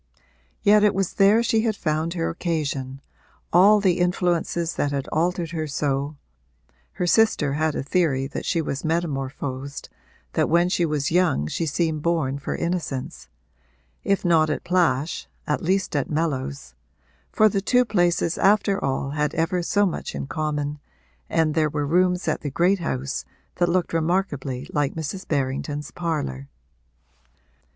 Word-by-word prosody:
Yet 210 0 +6
it 210 -2 +4
was 195 -2 -1
there 210 +4 +5
she 225 -1 +2
had 220 -2 0
found 160 0 -1
her 165 -1 -1
occasion, 140 -6 -3 0.5
all 200 +5 +7
the 185 -3 +2
influences 175 -1 0
that 145 - -1
had 140 -1 -2
altered 170 0 0
her 160 -2 -3
so 140 0 -1 0.8
(her 180 - -2
sister 175 -8 +3
had 155 +1 0
a - - -2
theory 140 -3 +1
that 135 - -5
she 165 - 0
was 140 -2 -4
metamorphosed, 140 -4 -3 0.4
that - - +1
when 170 +2 +3
she 175 -2 +1
was 150 -2 -1
young 170 - +2
she 160 - -2
seemed 155 0 0
born 150 -5 0
for 140 - -4
innocence) 165 - -4 0.7
if 195 -1 0
not 160 -3 +4
at 150 - -2
Plash 170 -4 0 0.2
at 150 - -1
least 185 0 0
at 145 - 0
Mellows, 130 - -2 0.6
for 215 - +5
the 200 -1 0
two 250 +5 +3
places 175 -5 +1
after 200 0 +3
all 135 0 -1
had 150 0 -1
ever 170 +3 0
so 205 +4 +2
much 180 - -4
in - - -3
common, 150 0 -3 0.5
and 160 -2 +2
there 155 -1 +2
were 145 0 -2
rooms 180 +3 +2
at - - 0
the 145 - -3
great 180 +7 +2
house 135 -4 -3 0.3
that 175 -1 +2
looked 180 -1 0
remarkably 155 -6 -1
like 145 -1 0
Mrs. 160 +4 -5
Berrington's 145 +1 -2
parlour. 70 - -3
160 Hz, 155 wpm, -24 LUFS, 145-180 Hz, 0.8 s, all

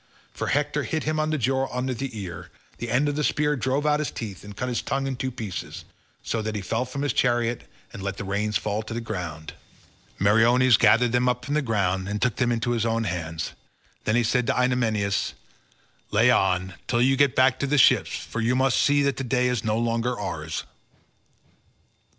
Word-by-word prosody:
For - - -4
Hector 145 +1 0
hit 155 +1 -2
him 155 0 -1
on 155 0 0
the 155 - 0
jaw 135 +1 0
under 130 +1 -2
the 125 -1 -5
ear; 90 -4 -7 0.3
the 120 - -4
end 135 +6 +2
of 145 - -1
the 150 - -1
spear 150 0 +1
drove 130 +4 -1
out 150 0 +3
his 150 - -1
teeth 105 -5 -7
and 105 0 -11
cut 125 - -2
his 125 -2 -1
tongue 135 0 -2
in 135 -1 -2
two 130 +1 -2
pieces, 110 -7 -6 0.4
so 115 - -2
that 110 0 -3
he 105 - -2
fell 115 +7 -1
from 140 +3 -5
his 145 -4 0
chariot 120 -1 0 0.2
and - - -8
let 100 0 -4
the - - -5
reins 100 +1 0
fall 105 0 -2
to 110 +1 -7
the - - -1
ground. 85 -8 -6 0.6
Meriones 115 +5 +5
gathered 120 +1 +4
them 125 +1 +2
up 125 0 -2
from 145 - -3
the 150 - +2
ground 95 -6 0
and 105 +1 -2
took 125 -2 0
them 120 -1 +1
into 120 +1 0
his 115 -2 0
own 115 0 0
hands, 80 -4 -3 0.5
then 110 - +2
he 120 - +3
said 115 +2 +1
to - - +1
Idomeneus, 110 -6 0 0.7
"Lay 115 +4 +4
on, 95 -4 +1
till 120 0 +2
you 135 +1 +4
get 140 -3 +3
back 130 0 +4
to 140 - -1
the 150 +2 +1
ships, 130 - +4
for 115 - -5
you 120 +2 +2
must 130 0 +2
see 145 0 +3
that 140 -1 0
the 135 - -3
day 125 0 +1
is 125 -2 -1
no 110 -1 0
longer 115 +1 -1
ours." - - -4
120 Hz, 215 wpm, -25 LUFS, 105-130 Hz, 0.7 s, Meriones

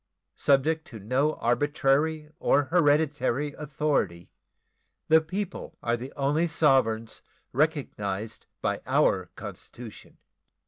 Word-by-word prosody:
Subject 155 +4 +2
to 115 - -9
no 130 +9 +1
arbitrary 145 +4 +1
or 145 - +3
hereditary 145 -3 +1
authority, 140 - -2 0.8
the 160 0 +7
people 190 +4 -5
are 120 0 +1
the 125 +3 -7
only 145 +5 +1
sovereigns 130 -8 +2 0.3
recognized 110 - -2 0.2
by - - 0
our - - +2
Constitution. 115 -3 -10
145 Hz, 95 wpm, -27 LUFS, 120-155 Hz, 0.8 s, the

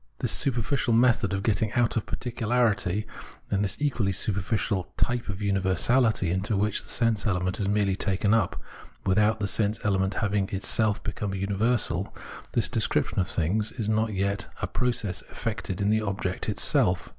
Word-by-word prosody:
This - - -1
super 125 -4 +1
ficial 120 -1 +1
method 115 -5 +3
of 95 0 -2
gettuag 110 0 0
out 120 -1 +2
of 115 - -2
particularity, 110 -5 0 0.5
and 100 0 +1
this 95 - 0
equally 125 -9 0
superficial 100 0 -1
type 120 -3 0
of 100 0 -4
universahty, 95 +1 +2
into 100 +3 0
which 105 +1 +2
the - - -15
sense 115 -3 +1
element 90 -1 -1
is 100 - 0
merely 100 -1 +1
taken 100 +1 +1
up, 110 -6 +1 0.5
without 105 +3 +3
the 100 - -1
sense 105 +1 +1
element 95 -1 +1
havmg 100 -2 0
in - - -3
itself 105 +2 +1
become 100 -2 -3
a - - -3
universal, 100 -1 0 0.4
this - - +3
descrip - - 0
tion - - -2
of 90 - +1
things 105 +6 0
— - - -18
is 110 -3 -2
not 110 +1 +1
as 105 - -5
yet 100 +1 -1
a - - -1
process 115 -7 -2
effected 105 -5 -4
in 100 +1 +2
the 110 0 +2
object 95 -3 -2
itself. 90 0 +2
105 Hz, 180 wpm, -26 LUFS, 95-110 Hz, 0.5 s, method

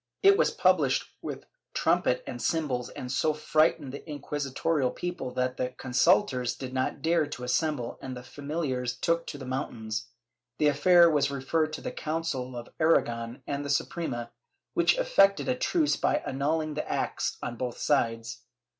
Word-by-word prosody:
It 395 0 +8
was 465 - +3
published - - +2 0.2
with - - -6 0.3
trumpet - - +2
and - - -6
cymbals 140 -7 -1
and 125 - -6
so 150 +4 +1
frightened 155 -2 +2
the 140 - -5
inqui 145 0 -4
sitorial 145 -1 +1
people 175 -7 -4
that 125 0 0
the 125 0 -2
consultors 130 -1 +2
did 130 -1 -7
not 130 +2 -2
dare 165 -2 +2
to 125 -4 -7
assemble 125 -1 -1
and 130 -1 -6
the 125 - -9
familiars 135 -3 -3
took 170 +3 0
to 145 - -5
the 135 - -8
mountains. 115 -4 -4 0.5
The 150 - +4
affair 170 +4 +6
was 150 -4 +2
referred 155 +3 0
to - - -5
the - - -4
Council 155 -6 -3
of 120 - -7
Aragon 120 -6 +1
and 145 0 -3
the 145 - -5
Suprema, 135 -5 -2 0.4
which - - +3
effected - - +4
a 255 - +3
truce 300 +4 +1
by 300 - +1
annulhng 155 +3 0
the 150 - -4
acts - - -1
on 120 - -3
both 125 0 -4
sides. 115 -4 0
145 Hz, 165 wpm, -28 LUFS, 125-165 Hz, 0.5 s, It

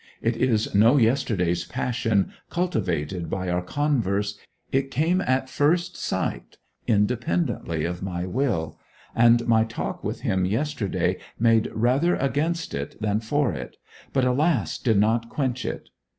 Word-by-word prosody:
It 115 0 0
is 115 -3 +1
no 115 +7 +5
yesterday's 110 -9 +1
passion, 115 -2 -1 0.2
cultivated 90 - -1
by 95 -1 -2
our 90 0 0
converse; 105 -4 0 0.4
it 135 0 +1
came 165 +8 +1
at 130 -2 0
first 170 +7 +1
sight, - - -3 0.3
independently 115 - 0
of 90 +1 -4
my 90 -2 -3
will; 95 - -1 0.4
and 120 0 +5
my 110 -1 +4
talk 110 - -5
with - - -4
him 95 -1 0
yesterday 115 +2 -1 0.2
made 115 -1 +3
rather 130 +10 +2
against 155 +5 -1
it 70 0 -5
than 105 -1 0
for 120 0 0
it, 70 - -7 0.3
but, 130 -2 +2
alas, 145 +6 +1
did 115 -5 +2
not 115 +3 +2
quench 130 -3 -2
it. - - -5
115 Hz, 135 wpm, -25 LUFS, 100-135 Hz, 0.4 s, no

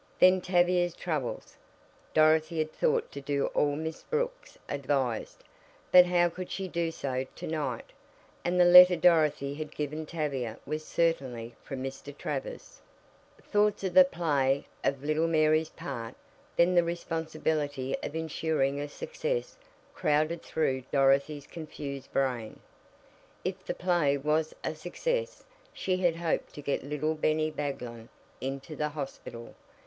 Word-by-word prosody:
Then 185 0 +6
Tavia's 175 -1 +2
troubles. 155 -8 -4 0.6
Dorothy 155 +1 +4
had 155 0 0
thought 475 -2 +1
to 140 - -7
do 140 0 0
all 145 -1 +2
Miss 160 +1 -4
Brooks - - -3
advised, 135 -4 -2 0.5
but 180 -1 +9
how 175 -1 +4
could 180 +1 -6
she 190 -1 -3
do 170 -1 -1
so 130 -4 -3
to - - -7
night? 145 -7 -3 0.5
And 180 +1 +1
the 175 - +7
letter 180 +1 +10
Dorothy 155 -4 +3
had 155 +1 -7
given 150 +1 -3
Tavia 135 -9 -3
was 155 0 -3
certainly 130 -10 -1
from 135 -2 -6
Mr. 135 +2 -7
Travers. - - -5 0.6
Thoughts 210 -1 +1
of 190 - -1
the 275 - +10
play, 145 - +1 0.2
of 140 0 0
little 155 +2 +1
Mary's 155 -1 +3
part, 115 -4 -6 0.4
then 175 +2 +4
the 175 -1 +5
responsibility 155 -5 -2
of 150 - -5
insuring 155 -3 0
a 145 - -3
success, 485 - -3 0.4
crowded 155 +3 +1
through 135 -4 -1
Dorothy's 140 +1 +2
confused 140 -4 -7
brain. 125 -5 -1 0.9
If - - -3
the - - -4
play 170 -6 +2
was 155 +3 0
a - - -1
success 485 - -3 0.3
she 185 -1 0
had 175 -3 +2
hoped 165 -1 -2
to 145 - -8
get 140 - -1
little 150 +2 -1
Bennie 155 0 +1
Baglin 125 -6 -5 0.3
into 135 +3 -5
the 150 +1 -1
hospital. 135 -5 -7
155 Hz, 140 wpm, -29 LUFS, 140-175 Hz, 0.9 s, letter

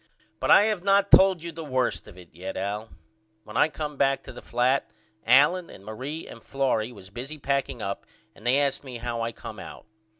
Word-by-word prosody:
But - - -2
I - - +8
have 210 -4 0
not 200 0 +3
told 190 -3 +7
you 170 - -5
the 165 +1 -7
worst 130 -4 -1
of 90 - -13
it 90 -3 -15
yet 90 +3 -6
Al. 105 +3 -3 0.5
When 105 - -12
I - - +5
come 150 -1 -5
back 135 0 +2
to - - -10
the - - -10
flat 125 +3 +1 0.4
Allen 150 +8 +5
and 95 - -13
Marie 130 +9 -5
and - - -11
Florrie 130 -4 0
was 100 -4 -13
busy 130 +8 -6
packing 140 -4 -1
up 100 0 -4 0.3
and - - -18
they 130 +3 +4
asked 140 -1 0
me 130 -3 -7
how 120 0 -3
I 115 0 -1
come - - -9
out. - - -10
130 Hz, 210 wpm, -26 LUFS, 110-150 Hz, 0.5 s, I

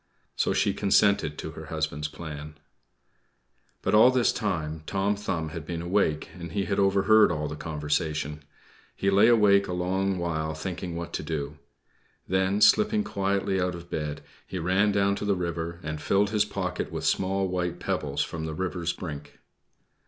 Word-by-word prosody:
So - - +1
she - - +2
consented 100 -6 +2
to 80 - -5
her 80 +1 -9
husband's 80 -2 -2
plan. 75 -1 -8 1.3
But - - 0
all 110 +4 +8
this 130 -2 +2
time 80 -7 -2
Tom 100 +1 0
Thumb 95 -6 -3
had 80 0 -6
been 85 +1 -5
awake, 85 -4 0
and 85 -3 -8
he 100 -1 0
had 100 0 -1
overheard 100 +1 +5
all 75 -2 -2
the 75 - -5
conversation. 75 -1 -2 0.5
He 100 - +1
lay 100 +3 +6
awake 105 -4 +5
a 90 - -3
long 95 +2 0
while 80 -3 -2
thinking 90 +1 -5
what 85 0 -6
to - - -2
do. 75 -1 -4 0.7
Then, 95 +2 +1
slipping 215 - +5
quietly 100 - 0
out 90 0 -1
of 85 0 -11
bed, 75 -1 -3 0.3
he 95 - -5
ran 95 +5 +2
down 100 0 +2
to - - -5
the 100 -1 +2
river 85 -1 -3
and 75 -1 -4
filled 100 +7 +2
his 105 -1 +2
pocket 90 -3 -3
with - - -4
small 95 0 +1
white 90 -1 -2
pebbles 70 -1 -1
from 80 +1 -5
the 80 - -4
river's 90 -1 -2
brink. 75 -4 -8
90 Hz, 170 wpm, -27 LUFS, 80-100 Hz, 1.3 s, all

